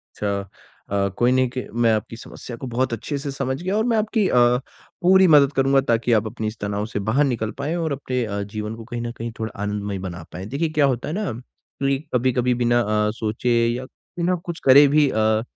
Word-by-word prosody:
अच्छा 100 Hz, -2 st, -3 dB, 0.4 s
अ, 100 Hz, 0 st, +1 dB
कोई 120 Hz, +1 st, +4 dB
नहीं 130 Hz, -1 st, +2 dB
क 125 Hz, -, -3 dB, 0.2 s
मैं 115 Hz, -, +5 dB
आपकी 110 Hz, +1 st, -3 dB
समस्या 120 Hz, 0 st, -9 dB
को 130 Hz, -, -7 dB
बहुत 125 Hz, +1 st, -1 dB
अच्छे 140 Hz, +6 st, -3 dB
से 140 Hz, 0 st, -4 dB
समझ 135 Hz, +2 st, -3 dB
गया 185 Hz, +3 st, -1 dB
और 220 Hz, -, +1 dB
मैं 230 Hz, -2 st, +2 dB
आपकी 215 Hz, -1 st, +1 dB
अ, -, -, 0 dB, 0.7 s
पूरी 190 Hz, +1 st, +6 dB
मदद 145 Hz, -4 st, +6 dB
करूँगा 135 Hz, 0 st, +3 dB
ताकि 115 Hz, +1 st, +2 dB
आप 110 Hz, -1 st, +3 dB
अपनी 110 Hz, -1 st, -4 dB
इस 110 Hz, -, -5 dB
तनाव 100 Hz, +1 st, -2 dB
से 105 Hz, -, -2 dB
बाहर 135 Hz, +7 st, +3 dB
निकल 115 Hz, -5 st, -1 dB
पाए 145 Hz, +4 st, -2 dB
और 165 Hz, -3 st, -1 dB
अपने 130 Hz, -3 st, -2 dB
अ, 100 Hz, -1 st, -3 dB
जीवन 105 Hz, +2 st, -5 dB
को 115 Hz, -, -9 dB
कहीं 120 Hz, 0 st, -5 dB
न 120 Hz, 0 st, -4 dB
कहीं 115 Hz, +1 st, -4 dB
थोड़ा 110 Hz, -1 st, -3 dB
आनंदमय 105 Hz, -1 st, -3 dB
बना 90 Hz, -3 st, -6 dB
पाए। 90 Hz, +2 st, -7 dB
देखिए 145 Hz, +8 st, -2 dB
क्या 145 Hz, -, +5 dB
होता 130 Hz, -2 st, -1 dB
है -, -, -3 dB
ना 210 Hz, -5 st, -2 dB, 0.5 s
कि 135 Hz, 0 st, +2 dB, 0.2 s
कभी-कभी 125 Hz, 0 st, +2 dB
बिना 120 Hz, 0 st, +3 dB
अ, 105 Hz, -1 st, +1 dB
सोचे 115 Hz, +2 st, 0 dB
या 120 Hz, +2 st, -2 dB
बिना 175 Hz, +6 st, -3 dB
कुछ 170 Hz, -1 st, -5 dB
करे 140 Hz, +2 st, +8 dB
भी 150 Hz, +1 st, +4 dB
अ, 110 Hz, -1 st, +2 dB
120 Hz, 225 wpm, -22 LUFS, 110-140 Hz, 0.7 s, करे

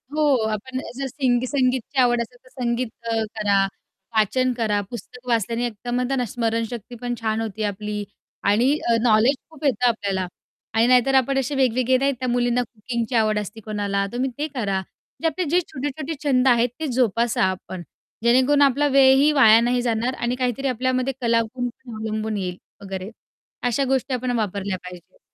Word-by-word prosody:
हो. 310 Hz, -, +1 dB, 0.3 s
आपण 255 Hz, +5 st, -4 dB, 0.2 s
जर 270 Hz, 0 st, -3 dB
सिंग 250 Hz, -2 st, +1 dB
संगीतची 260 Hz, 0 st, 0 dB
आवड 240 Hz, -1 st, +3 dB
असेल, 245 Hz, +2 st, -7 dB
तर -, -, -18 dB
संगीत 235 Hz, +1 st, 0 dB, 0.2 s
अ, 225 Hz, -1 st, +1 dB, 0.2 s
करा, 200 Hz, -2 st, +3 dB, 0.5 s
वाचन 255 Hz, +4 st, +2 dB
करा. 210 Hz, -3 st, +1 dB
पुस्तक 250 Hz, +1 st, -10 dB
वाचल्याने 230 Hz, +1 st, 0 dB
एकदम 245 Hz, +3 st, -2 dB
स्मरणशक्ती 230 Hz, +1 st, -3 dB
पण 245 Hz, 0 st, -2 dB
छान 220 Hz, 0 st, 0 dB
होती 220 Hz, -1 st, -4 dB
आपली. 210 Hz, 0 st, -3 dB, 0.4 s
आणि 230 Hz, +7 st, +3 dB, 0.2 s
अ, 230 Hz, -, +5 dB
नॉलेज 230 Hz, +4 st, +4 dB
खूप 310 Hz, -2 st, -9 dB
येतं 250 Hz, -2 st, +2 dB
आपल्याला. 195 Hz, -5 st, -1 dB, 0.5 s
आणि 225 Hz, +2 st, +3 dB
नाही 250 Hz, -1 st, +6 dB
तर 270 Hz, 0 st, +2 dB
आपण 270 Hz, +1 st, +3 dB
असे 270 Hz, +2 st, -2 dB
वेगवेगळे 255 Hz, -1 st, +2 dB
नाही, 275 Hz, +2 st, +2 dB
त्या 255 Hz, -, -2 dB
मुलींना 245 Hz, 0 st, +2 dB
कुकिंगची 235 Hz, +1 st, -4 dB
आवड 215 Hz, -1 st, +3 dB
असते 210 Hz, +2 st, -7 dB
कोणाला, 200 Hz, -2 st, -1 dB
तुम्ही 255 Hz, +2 st, 0 dB
ते 300 Hz, -, -1 dB
करा, 205 Hz, -9 st, -2 dB, 0.4 s
जे 330 Hz, -, +2 dB
आपले 330 Hz, +3 st, -1 dB
जे 350 Hz, +4 st, +4 dB
छोटे-छोटे 290 Hz, +3 st, -4 dB
छंद 265 Hz, -2 st, +3 dB
आहेत, 240 Hz, -1 st, +4 dB
ते 315 Hz, -, -2 dB
जोपासा 235 Hz, -4 st, +1 dB
आपण. 185 Hz, -1 st, -2 dB, 0.4 s
जेणेकरून 260 Hz, +4 st, +4 dB
आपला 285 Hz, +1 st, +4 dB
वेळही 270 Hz, +2 st, +6 dB
वाया 225 Hz, -6 st, +7 dB
नाही 245 Hz, +1 st, +1 dB
जाणार. 240 Hz, +1 st, 0 dB
आणि 240 Hz, +1 st, -1 dB
काहीतरी 255 Hz, +1 st, -1 dB
आपल्यामध्ये 255 Hz, +1 st, 0 dB
कलागुण 235 Hz, +1 st, 0 dB, 0.2 s
अवलंबून 215 Hz, 0 st, -3 dB
येईल 180 Hz, -2 st, -3 dB, 0.2 s
वगैरे. 190 Hz, 0 st, -6 dB, 0.6 s
अशा 245 Hz, +3 st, +1 dB
गोष्टी 265 Hz, 0 st, 0 dB
आपण 250 Hz, 0 st, -1 dB
वापरल्या 200 Hz, -2 st, -2 dB
पाहिजेत. 180 Hz, -, -12 dB
240 Hz, 165 wpm, -23 LUFS, 215-260 Hz, 0.6 s, वाया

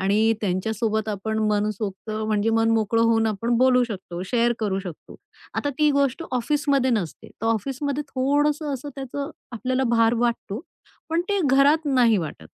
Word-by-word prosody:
आणि 210 Hz, +4 st, +3 dB
त्यांच्यासोबत 215 Hz, +3 st, -1 dB
आपण 215 Hz, +1 st, -2 dB
मनसोक्त 210 Hz, 0 st, -2 dB
म्हणजे 215 Hz, 0 st, 0 dB
मनमोकळं 225 Hz, 0 st, +2 dB
होऊन 225 Hz, -1 st, +3 dB
आपण 230 Hz, +3 st, 0 dB
बोलू 255 Hz, 0 st, +5 dB
शकतो, 185 Hz, -6 st, -6 dB
शेअर 240 Hz, +3 st, +2 dB
करू 200 Hz, -3 st, -1 dB
शकतो. 180 Hz, -5 st, -10 dB, 0.4 s
आता 290 Hz, -, -1 dB
ती 300 Hz, -1 st, +4 dB
गोष्ट 280 Hz, +1 st, +1 dB
ऑफिसमध्ये 275 Hz, +1 st, +1 dB
नसते. 205 Hz, -9 st, -2 dB
तर 225 Hz, -, -6 dB
ऑफिसमध्ये 270 Hz, +6 st, -1 dB
थोडसं 290 Hz, +3 st, +1 dB
असं 270 Hz, +2 st, -7 dB
त्याचं 280 Hz, +2 st, -5 dB, 0.2 s
आपल्याला 255 Hz, +3 st, -1 dB
भार 230 Hz, +1 st, +4 dB
वाटतो, 230 Hz, -2 st, -2 dB, 0.5 s
पण 330 Hz, +1 st, +2 dB
ते 405 Hz, -1 st, +1 dB
घरात 280 Hz, +4 st, +4 dB
नाही 250 Hz, -5 st, +4 dB
वाटत. 150 Hz, -, -6 dB
230 Hz, 150 wpm, -24 LUFS, 215-270 Hz, 0.5 s, बोलू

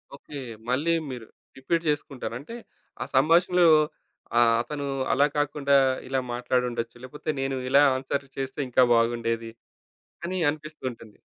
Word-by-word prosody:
Okay. 140 Hz, 0 st, -9 dB, 0.3 s
మళ్ళీ 150 Hz, +7 st, +1 dB, 0.2 s
మీరు 120 Hz, -3 st, -7 dB, 0.3 s
repeat 165 Hz, +5 st, -1 dB
చేసుకుంటారు. 145 Hz, -5 st, -3 dB
అంటే, 230 Hz, -, -9 dB, 0.5 s
ఆ -, -, -1 dB
సంభాషణలో 170 Hz, +5 st, +4 dB, 0.7 s
ఆహ్, 115 Hz, -1 st, +5 dB
అతను 145 Hz, +1 st, -5 dB, 0.3 s
అలా 140 Hz, +2 st, +4 dB
కాకుండా 145 Hz, -1 st, +1 dB, 0.3 s
ఇలా 135 Hz, 0 st, 0 dB
మాట్లాడుండొచ్చు. 120 Hz, -1 st, -1 dB
లేకపోతే, 150 Hz, +4 st, -7 dB
నేను 135 Hz, 0 st, -1 dB
ఇలా 140 Hz, +2 st, +6 dB
ఆన్‌సర్లు 135 Hz, +1 st, -3 dB
చేస్తే 135 Hz, +1 st, -4 dB
ఇంకా 125 Hz, +1 st, +5 dB
బాగుండేది 115 Hz, -1 st, 0 dB, 0.8 s
అని 185 Hz, +2 st, -2 dB
అనిపిస్తూ 150 Hz, +1 st, -5 dB
ఉంటుంది. 115 Hz, -3 st, -14 dB
135 Hz, 125 wpm, -26 LUFS, 125-150 Hz, 0.8 s, ఇలా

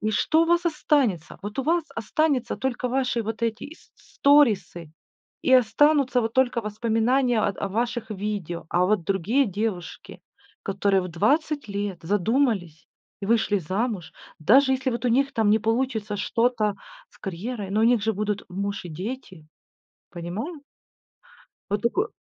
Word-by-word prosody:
И 215 Hz, 0 st, 0 dB
что 315 Hz, +9 st, +2 dB
у -, -, +1 dB
вас 345 Hz, +1 st, +2 dB
останется? 270 Hz, -, 0 dB
Вот 205 Hz, +4 st, -7 dB
у -, -, +1 dB
вас 330 Hz, +2 st, +1 dB
останется 260 Hz, +2 st, 0 dB
только 250 Hz, -1 st, -2 dB
ваши 250 Hz, -2 st, 0 dB
вот 225 Hz, +2 st, -5 dB
эти 225 Hz, -1 st, -1 dB
ис 315 Hz, -, -13 dB
с -, -, -24 dB
сторисы, 220 Hz, -, +3 dB, 0.5 s
и 260 Hz, -, +2 dB
останутся 260 Hz, +2 st, +4 dB
вот 225 Hz, -, -2 dB
только 255 Hz, -2 st, +2 dB
воспоминания 225 Hz, +3 st, +1 dB
о -, -, +2 dB, 0.2 s
о -, -, -4 dB
ваших 230 Hz, +2 st, -2 dB
видео. 195 Hz, -5 st, -4 dB
А 175 Hz, +1 st, +2 dB
вот 210 Hz, -4 st, +1 dB
другие 200 Hz, +10 st, +1 dB
девушки, 200 Hz, -3 st, -5 dB, 0.4 s
которые 195 Hz, -1 st, +1 dB
в 180 Hz, -, -5 dB
20 285 Hz, -, 0 dB
лет 200 Hz, -3 st, -4 dB
задумались? 200 Hz, -, 0 dB, 0.3 s
и 200 Hz, -, -4 dB
вышли 220 Hz, -2 st, +2 dB
замуж, 190 Hz, 0 st, -3 dB, 0.3 s
даже 265 Hz, -, +5 dB
если 260 Hz, 0 st, 0 dB
вот 240 Hz, +1 st, -4 dB
у 245 Hz, -, +3 dB
них 275 Hz, +4 st, +2 dB
там 220 Hz, -2 st, +1 dB
не 215 Hz, +1 st, +5 dB
получится 225 Hz, -2 st, -1 dB
что-то 225 Hz, -1 st, +1 dB, 0.3 s
с -, -, -23 dB
карьерой. 195 Hz, +3 st, -5 dB
Но 210 Hz, +2 st, +1 dB
у -, -, +4 dB
них 235 Hz, -2 st, +3 dB
же 220 Hz, -, +1 dB
будут 210 Hz, 0 st, -2 dB
муж 200 Hz, +2 st, -3 dB
и 175 Hz, -, -7 dB
дети. 185 Hz, -, -7 dB, 0.6 s
Понимаю. 215 Hz, -, -6 dB, 1.1 s
Вот 205 Hz, 0 st, 0 dB
такой 370 Hz, -, +1 dB
225 Hz, 160 wpm, -25 LUFS, 200-260 Hz, 1.1 s, даже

